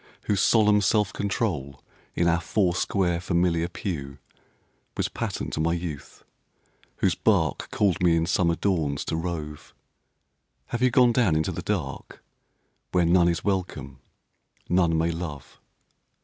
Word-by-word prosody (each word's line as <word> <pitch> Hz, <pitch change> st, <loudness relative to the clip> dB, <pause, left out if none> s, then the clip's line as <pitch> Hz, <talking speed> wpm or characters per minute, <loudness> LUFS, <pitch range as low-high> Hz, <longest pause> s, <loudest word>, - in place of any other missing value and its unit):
whose 100 Hz, -3 st, 0 dB
solemn 105 Hz, -2 st, +4 dB
self 105 Hz, +1 st, +1 dB
control 90 Hz, -, -2 dB, 0.4 s
In 85 Hz, -, +2 dB
our 85 Hz, 0 st, +2 dB
four 95 Hz, 0 st, +1 dB
square, 90 Hz, -2 st, 0 dB
familiar 85 Hz, -2 st, +1 dB
pew, 70 Hz, -7 st, -5 dB, 0.8 s
Was -, -, 0 dB
pattern -, -, -4 dB
to -, -, -3 dB
my 85 Hz, +2 st, +1 dB
youth 85 Hz, -5 st, -6 dB, 0.7 s
whose -, -, +1 dB
bark -, -, +1 dB
Called 100 Hz, -5 st, +1 dB
me 85 Hz, -2 st, +4 dB
in 80 Hz, 0 st, +1 dB
summer 85 Hz, -1 st, +1 dB
dawns 80 Hz, -7 st, -1 dB
to -, -, -2 dB
rove 80 Hz, -3 st, -5 dB, 0.9 s
Have 120 Hz, -, -3 dB
you 130 Hz, -, +4 dB
gone 125 Hz, 0 st, +5 dB
down 115 Hz, -9 st, +2 dB
into 80 Hz, 0 st, 0 dB
the -, -, -5 dB
dark -, -, -4 dB, 0.7 s
Where 90 Hz, -2 st, +2 dB
none 85 Hz, +1 st, +4 dB
is 85 Hz, -1 st, -2 dB
welcome, 95 Hz, -3 st, -3 dB, 0.7 s
none 85 Hz, -2 st, +2 dB
may 80 Hz, +1 st, +1 dB
love? 80 Hz, -5 st, -7 dB
85 Hz, 140 wpm, -25 LUFS, 80-100 Hz, 0.9 s, gone